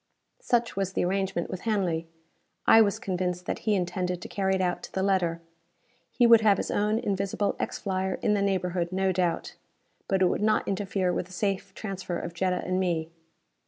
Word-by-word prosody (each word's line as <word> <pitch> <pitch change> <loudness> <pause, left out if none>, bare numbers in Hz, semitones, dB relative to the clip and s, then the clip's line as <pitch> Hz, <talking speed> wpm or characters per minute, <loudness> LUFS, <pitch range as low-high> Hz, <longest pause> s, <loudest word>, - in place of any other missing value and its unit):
Such 235 -1 0
was 195 -1 -1
the - - +1
arrangement 190 -2 -1
with 185 - -5
Hanley. 180 -7 0 0.6
I 225 - +8
was 200 -2 +2
convinced 180 -1 -2
that - - -3
he 210 - +4
intended 180 -1 -1
to - - -6
carry 190 -1 0
it - - -1
out 180 -1 0
to - - -9
the 190 - -1
letter. 175 -4 +1 0.7
He 245 - +2
would 230 -1 +8
have 205 -3 +4
his - - -3
own 210 +1 +1
invisible 200 -2 -1
X - - -2
flyer 190 -1 -1
in 210 - +3
the 205 - +1
neighborhood, 180 -3 0
no 190 0 +1
doubt. 175 -2 -1 0.5
But 190 -1 +2
it - - +6
would 180 - +1
not 215 0 +2
interfere 190 -2 0
with 180 - -2
the 185 - -14
safe 195 0 -2
transfer 190 -4 -4
of 170 - -5
Jetta 180 +1 0
and 185 0 0
me. 165 -3 -1
190 Hz, 195 wpm, -27 LUFS, 180-200 Hz, 0.7 s, I